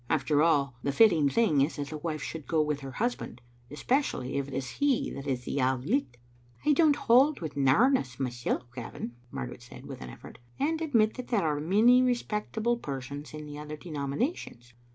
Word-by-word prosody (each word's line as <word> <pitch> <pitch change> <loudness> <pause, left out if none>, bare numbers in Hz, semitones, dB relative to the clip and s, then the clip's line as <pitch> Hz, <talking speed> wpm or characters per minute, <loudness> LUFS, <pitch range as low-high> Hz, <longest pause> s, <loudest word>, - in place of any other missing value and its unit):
After 150 -1 +2
all, 140 -6 +2
the 140 - -1
fitting 165 -5 +5
thing 175 -8 +3
is 145 +4 +1
that 145 -1 -4
the 155 - -5
wife 155 -1 -4
should 160 -3 -6
go 160 - +1
with 150 -1 -2
her 135 -2 -8
husband; 120 -1 -3 0.3
especially 145 - -1
if 140 - -3
it 140 - -9
is 135 -1 -3
he 275 - 0
that 140 +1 -7
is 130 -2 -1
the 140 - -2
Auld 130 0 0
Licht. 210 - 0 0.2
" 120 - -28
"I 300 - +5
don't 300 -1 +4
hold 275 +2 +4
with 160 -4 -6
narrowness 140 - +3
myself, 125 -1 -2
Gavin," 120 -1 -6 0.2
Mar - - -4
garet 125 0 -9
said, 125 - -12
with - - -8
an 60 - -7
effort, - - -12 0.2
"and 315 +3 0
admit 230 -9 +2
that 255 - -6
there 210 -8 +1
are 150 -2 0
many 215 +10 +5
respectable 235 -1 0
persons 140 - -6
in 150 0 -7
the 145 0 -8
other 150 0 -7
denominations. 140 - -4
150 Hz, 200 wpm, -29 LUFS, -, 0.3 s, fitting